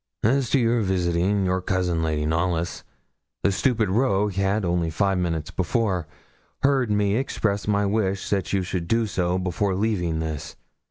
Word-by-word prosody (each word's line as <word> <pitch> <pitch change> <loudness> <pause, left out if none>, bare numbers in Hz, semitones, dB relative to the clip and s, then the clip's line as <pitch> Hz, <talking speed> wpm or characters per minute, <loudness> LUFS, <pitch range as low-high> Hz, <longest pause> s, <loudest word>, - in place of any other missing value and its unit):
'As 130 +3 +2
to 140 - +3
your 115 -1 +2
visiting 95 +1 +1
your 90 0 0
cousin, 90 -2 0
Lady 75 -2 0
Knollys, 85 +1 -1 0.6
the 100 - +3
stupid 115 +1 +1
rogue 105 -1 +1
had 100 +2 0
only 85 -1 0
five 95 +3 +1
minutes 80 -3 -2
before 95 -3 -1 0.6
heard 135 -4 +3
me 105 -1 +2
express 105 -6 -1
my 100 -1 +2
wish 100 -2 0
that 95 -3 0
you 95 -1 +1
should 90 -1 -3
do 115 +3 +2
so 90 -3 0
before 95 +1 -1
leaving 95 -6 0
this. 80 -2 -4
95 Hz, 160 wpm, -24 LUFS, 90-105 Hz, 0.6 s, to